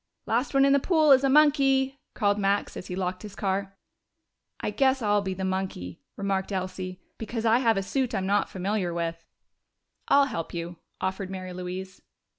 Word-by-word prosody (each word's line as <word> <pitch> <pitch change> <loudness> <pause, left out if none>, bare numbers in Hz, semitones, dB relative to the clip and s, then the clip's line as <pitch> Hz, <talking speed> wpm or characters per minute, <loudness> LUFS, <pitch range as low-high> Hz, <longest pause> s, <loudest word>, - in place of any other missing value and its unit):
"Last 245 +5 0
one 275 0 +6
in 275 - +5
the 280 - +5
pool 310 -1 +3
is 265 0 +7
a 275 - +3
monkey!" 275 -2 +4 0.2
called 205 -2 +1
Max, 200 0 0
as - - -7
he 180 - -4
locked 185 -1 -3
his 210 -2 -9
car. 195 0 -2 0.8
"I - - -2
guess 270 -1 +2
I'll 205 -1 +3
be 190 -1 -3
the 190 0 -3
monkey," 185 - -3 0.2
remarked 195 -1 -1
Elsie. 185 -1 -4 0.2
"Because 225 +1 -4
I 230 +2 +5
have 230 -4 +3
a 195 - 0
suit 250 +3 -1
I'm 190 -2 -1
not 200 +2 +1
familiar 190 -2 -2
with." 165 -1 -3 0.8
"I'll 280 0 +5
help 175 - -5
you," 170 0 -5 0.2
offered 190 0 -3
Mary 185 -1 -6
Louise. 185 +1 -6
195 Hz, 185 wpm, -27 LUFS, 185-255 Hz, 0.8 s, is